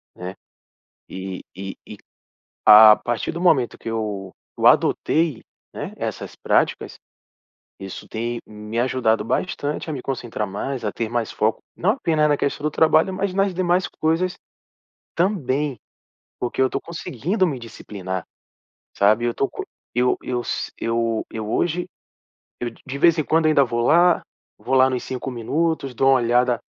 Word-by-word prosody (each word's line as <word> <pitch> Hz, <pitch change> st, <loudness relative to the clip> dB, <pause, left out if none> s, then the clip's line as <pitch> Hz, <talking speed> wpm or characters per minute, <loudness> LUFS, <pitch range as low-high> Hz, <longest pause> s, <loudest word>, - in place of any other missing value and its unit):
né? 90 Hz, +1 st, -6 dB, 0.8 s
E 95 Hz, 0 st, -6 dB
e 95 Hz, 0 st, -6 dB
e -, -, -9 dB, 0.7 s
a 110 Hz, 0 st, +10 dB
a -, -, +2 dB
partir 120 Hz, -1 st, -2 dB
do 170 Hz, -, -5 dB
momento 140 Hz, -9 st, +3 dB
que -, -, -6 dB
eu 105 Hz, -4 st, -3 dB, 0.3 s
eu -, -, +4 dB
adotei, 160 Hz, -6 st, +2 dB, 0.3 s
né, -, -, -6 dB
essas -, -, -5 dB
práticas, -, -, 0 dB, 0.8 s
isso 95 Hz, -1 st, -8 dB
tem 120 Hz, +1 st, -3 dB
me 105 Hz, +1 st, -6 dB
ajudado 120 Hz, -3 st, +1 dB
bastante 150 Hz, +3 st, -2 dB
a -, -, -2 dB
me 140 Hz, -, -4 dB
concentrar 120 Hz, -5 st, -3 dB
mais, 115 Hz, +6 st, -4 dB
a 105 Hz, -, -1 dB
ter 115 Hz, -, -3 dB
mais 120 Hz, 0 st, -2 dB
foco. 110 Hz, +1 st, 0 dB, 0.2 s
Não 185 Hz, -, +2 dB
apenas 160 Hz, -, +1 dB
na 145 Hz, -, +3 dB
questão 140 Hz, +1 st, -2 dB
do 150 Hz, -, +1 dB
trabalho, 160 Hz, +4 st, +3 dB
mas 190 Hz, 0 st, -2 dB
nas 195 Hz, 0 st, +2 dB
demais 180 Hz, 0 st, +1 dB
coisas 165 Hz, +3 st, 0 dB, 0.8 s
também, 150 Hz, -, 0 dB, 0.6 s
porque 120 Hz, +1 st, -2 dB
eu 130 Hz, -, +5 dB
estou -, -, -3 dB
conseguindo 170 Hz, -, -2 dB
me 145 Hz, -6 st, -2 dB
disciplinar, 95 Hz, -5 st, -6 dB, 0.7 s
sabe? 110 Hz, +4 st, +3 dB
Eu 120 Hz, -, -1 dB
tô 135 Hz, -, 0 dB
co -, -, -6 dB, 0.3 s
eu 125 Hz, +1 st, +2 dB
eu 125 Hz, -1 st, -2 dB
s -, -, -3 dB
Eu 115 Hz, -1 st, -1 dB, 0.3 s
hoje 175 Hz, +5 st, 0 dB, 0.7 s
eu 120 Hz, -, -2 dB
de 115 Hz, -, -20 dB
de 135 Hz, +1 st, -5 dB
vez 170 Hz, +2 st, +5 dB
em 155 Hz, -, +1 dB
quando 160 Hz, +2 st, +2 dB
ainda 155 Hz, -3 st, +5 dB
vou 120 Hz, -1 st, -2 dB
lá. 170 Hz, +6 st, +4 dB, 0.4 s
Vou -, -, -2 dB
lá 130 Hz, 0 st, +6 dB
nos 125 Hz, -2 st, -2 dB
5 130 Hz, +1 st, -4 dB
minutos, 140 Hz, +3 st, -1 dB
dou 135 Hz, +3 st, +2 dB
uma 135 Hz, -, +6 dB
olhada 120 Hz, 0 st, +2 dB
130 Hz, 160 wpm, -22 LUFS, 115-160 Hz, 0.8 s, a